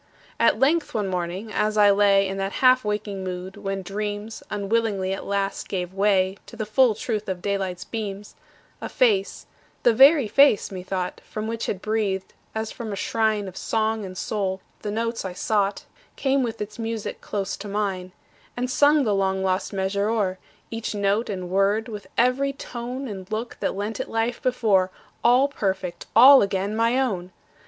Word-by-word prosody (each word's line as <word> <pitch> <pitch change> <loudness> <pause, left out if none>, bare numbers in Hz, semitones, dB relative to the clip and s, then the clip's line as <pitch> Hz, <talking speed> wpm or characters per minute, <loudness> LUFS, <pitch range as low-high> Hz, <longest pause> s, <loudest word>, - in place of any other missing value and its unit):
At 230 - +4
length, 290 +5 +2
one 210 -3 0
morning, 180 +4 -3
as 215 0 0
I 205 -1 +7
lay 200 -1 +4
In 195 0 -4
that 195 0 -2
half 255 0 +4
waking 210 -2 -3
mood 185 +1 -5
when 195 -1 -4
dreams 205 +3 -4
Unwillingly 205 -2 0
at 195 - -6
last 200 0 -2
gave 180 -1 -3
way 195 -1 +2
To - - -11
the 220 -1 -3
full 225 +1 +3
truth 215 -3 -3
of 180 -2 -4
daylight's 190 -3 -2
beams, 210 -2 -5 0.5
A - - -4
face 430 -6 +1 0.4
the 240 - +5
very 275 +1 +6
face, 275 -3 +4
methought, 185 -1 -4
From 215 0 -5
which 230 0 -3
had 190 - -3
breathed, 210 -3 -1 0.2
as 220 0 -3
from 225 -3 -6
a - - -3
shrine 215 0 0
Of 185 - -9
song 220 +1 -1
and 185 -1 -7
soul, 190 -2 -2 0.2
the 210 - -4
notes 230 +2 -2
I 190 -2 -5
sought 200 +1 0 0.3
Came 270 0 +1
with 230 -3 -3
its 210 +2 -6
music 225 -1 -4
close 195 -2 -3
to 205 - -8
mine; 195 -3 -2 0.5
And 250 +1 -1
sung 290 +2 +4
the 215 -4 +1
long 190 -1 0
lost 185 0 0
measure 200 +1 -1
o'er, 195 -5 0 0.3
Each 225 -1 -4
note 205 +3 +1
and 185 -3 -4
word, 200 +3 +2
with 210 -3 -8
every 260 +3 +2
tone 250 0 -6
And 195 -2 -8
look, 225 +2 -4
that - - -1
lent 205 +2 -3
it - - -4
life 225 +1 -1
before, 215 -7 +2 0.3
All 250 +4 +5
perfect, 190 -9 -3
all 265 +4 +9
again 195 +1 -1
my 230 +3 +2
own! 190 -9 -1
210 Hz, 180 wpm, -24 LUFS, 195-230 Hz, 0.5 s, all